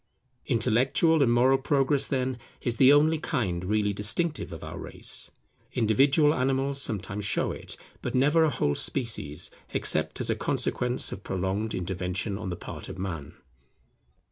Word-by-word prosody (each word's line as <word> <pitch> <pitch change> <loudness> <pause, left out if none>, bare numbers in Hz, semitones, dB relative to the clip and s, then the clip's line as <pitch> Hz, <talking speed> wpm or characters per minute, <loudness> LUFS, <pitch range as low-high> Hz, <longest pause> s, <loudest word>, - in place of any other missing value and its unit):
Intellectual 130 +7 +3
and 125 -4 +4
Moral 130 +3 +4
progress, 140 0 +2
then, 130 -2 -1 0.2
is 120 -2 -2
the 135 0 +7
only 155 +2 +4
kind 95 - -1
really 105 +1 +1
distinctive 105 - -1
of 80 - -8
our 80 - -7
race. - - -5 0.4
Individual 135 +7 +4
animals 135 +1 0
sometimes 100 -2 -3
show 105 +2 +1
it, - - -7 0.2
but - - -3
never 145 +5 +4
a 160 - +4
whole 95 - 0
species, 110 - -2 0.2
except - - +1
as - - 0
a - - +1
consequence 125 0 0
of 100 - -6
prolonged 95 +4 -2
intervention 95 +2 -2
on 95 - -4
the 90 - -3
part - - -8
of - - -7
Man. 85 -6 -5
120 Hz, 150 wpm, -27 LUFS, 95-135 Hz, 0.4 s, the